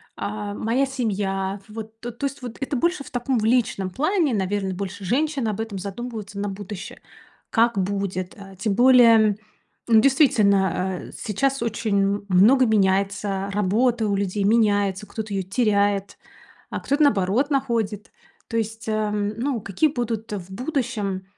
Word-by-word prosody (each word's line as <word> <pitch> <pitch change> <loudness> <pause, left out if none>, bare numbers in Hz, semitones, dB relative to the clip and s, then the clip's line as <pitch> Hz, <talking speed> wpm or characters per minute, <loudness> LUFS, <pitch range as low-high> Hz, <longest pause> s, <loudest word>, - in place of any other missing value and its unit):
а, 205 0 -4
моя 235 +6 0
семья. 200 -6 -2
Вот 220 +1 -9
то 240 0 -6
то 275 +5 -2
есть, 275 +1 -8 0.2
это 275 +1 -2
больше 340 +2 0
в - - -12
таком, 245 0 -1
в - - -2
личном 220 -5 +1
плане. 305 - +1
Наверно, 195 0 -1
больше 200 +1 -6
женщины 270 - 0
об 210 +1 -4
этом 225 -3 -4
задумываются 205 +1 -6
на 205 - -2
будущее, 195 0 -7 0.5
как 230 -2 +2
будет, 190 -1 -2
а. 195 -1 -12
Тем 200 +1 -1
более, 230 -4 +6 0.5
ну, 225 -2 +6
действительно, 215 -9 +4 0.4
а - - -11
сейчас 270 +5 -1
очень 205 -3 0
много 225 +8 +5
меняется, 195 -1 +1
работа 220 +4 +1
у 200 - 0
людей 200 0 -1
меняется, 205 -2 +2
кто-то 215 -2 -6
её 195 - 0
теряет, 200 -1 0 0.5
а - - -4
кто-то, 280 +3 -1
наоборот, 220 +2 +2
находит. 230 -7 -1 0.4
То 230 - -2
есть, 225 0 -3
эм, 210 -1 0
ну, 250 -2 -1
какие 200 - +1
будут 230 -4 -3
в 190 -2 -6
будущем, 225 - -2
215 Hz, 150 wpm, -23 LUFS, 200-240 Hz, 0.5 s, более